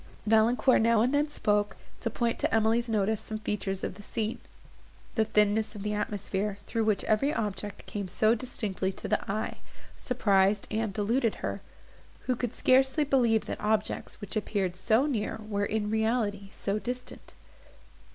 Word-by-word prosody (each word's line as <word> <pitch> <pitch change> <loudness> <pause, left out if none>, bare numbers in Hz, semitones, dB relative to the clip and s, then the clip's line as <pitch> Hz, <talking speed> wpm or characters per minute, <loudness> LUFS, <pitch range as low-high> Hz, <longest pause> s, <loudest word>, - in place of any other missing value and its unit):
Valancourt 225 +3 +4
now 230 -1 +4
and 250 +4 +2
then 295 +1 +2
spoke, 205 -6 0 0.2
to - - -1
point 235 -1 -1
to - - +1
Emily's 225 +2 +2
notice 215 0 +1
some 215 - -5
feature 210 -2 -3
of 195 -1 -2
the 205 - -12
scene. 215 +2 -2 0.7
The 220 -2 +2
thinness 215 +1 +2
of 200 - -6
the 210 0 -1
atmosphere, 205 -1 -2
through 225 -1 -1
which 215 -2 +1
every 220 +7 +2
object 210 -6 -4
came 200 -2 -4
so 215 +5 +3
distinctly 215 -6 -2
to - - -6
the - - +1
eye, 215 +2 -2 0.4
surprised 200 -5 +2
and 220 -1 0
deluded 225 +4 +1
her; - - -3 0.6
who 255 - 0
could 245 -1 -3
scarcely 265 +3 +4
believe 240 -6 +3
that - - -5
objects, 215 0 -1
which 205 -1 -6
appeared 200 -4 -1
so 220 +8 +2
near, 220 -6 -2
were, 205 -1 0
in 210 0 -1
reality, 220 -3 0
so 200 +1 -2
distant. 245 +2 -7
215 Hz, 160 wpm, -29 LUFS, 205-230 Hz, 0.7 s, Valancourt